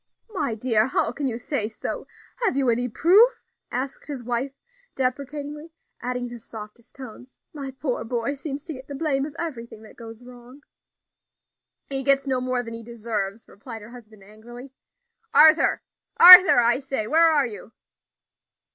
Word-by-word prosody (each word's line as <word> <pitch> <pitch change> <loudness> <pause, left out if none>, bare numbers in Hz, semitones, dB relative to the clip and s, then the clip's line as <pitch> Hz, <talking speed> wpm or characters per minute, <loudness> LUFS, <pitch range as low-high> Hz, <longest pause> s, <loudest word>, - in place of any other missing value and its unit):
"My 305 - -3
dear, 220 -1 +1
how 230 - -1
can 280 +3 -4
you 230 -3 -3
say 240 -4 -3
so? 220 - -7 0.3
have 465 - -1
you 265 -3 +2
any 245 +2 -2
proof?" 420 - +3 0.3
asked 260 +3 -5
his 275 -5 -7
wife, 245 +3 -3 0.4
deprecatingly 290 +4 -4 0.3
adding 250 0 -4
in 240 - -9
her 240 - -9
softest 225 +1 -12
tones, 255 0 -12 0.2
"my 280 -3 -7
poor 265 -1 -4
boy 235 +3 -3
seems 285 0 -7
to 320 - -6
get 260 -1 -11
the 285 - -7
blame 275 -2 -1
of 295 - -13
everything 235 -9 -7
that 215 - -15
goes 225 0 -12
wrong." 250 +2 -15 1.3
"He 270 -1 -3
gets 275 +1 +2
no 260 -2 -1
more 255 -1 -2
than 230 -1 -8
he 230 - -6
deserves," 225 -3 -5
replied 225 +1 -11
her 220 - -12
husband 220 -4 -15
angrily. 240 +6 -13 0.6
"Arthur! 315 +1 +5 0.3
Arthur, 365 -1 +10
I 240 +1 +2
say, 270 -5 -3
where 325 +7 +4
are 295 -4 +2
you?" 215 -2 -9
250 Hz, 165 wpm, -23 LUFS, 230-280 Hz, 1.3 s, Arthur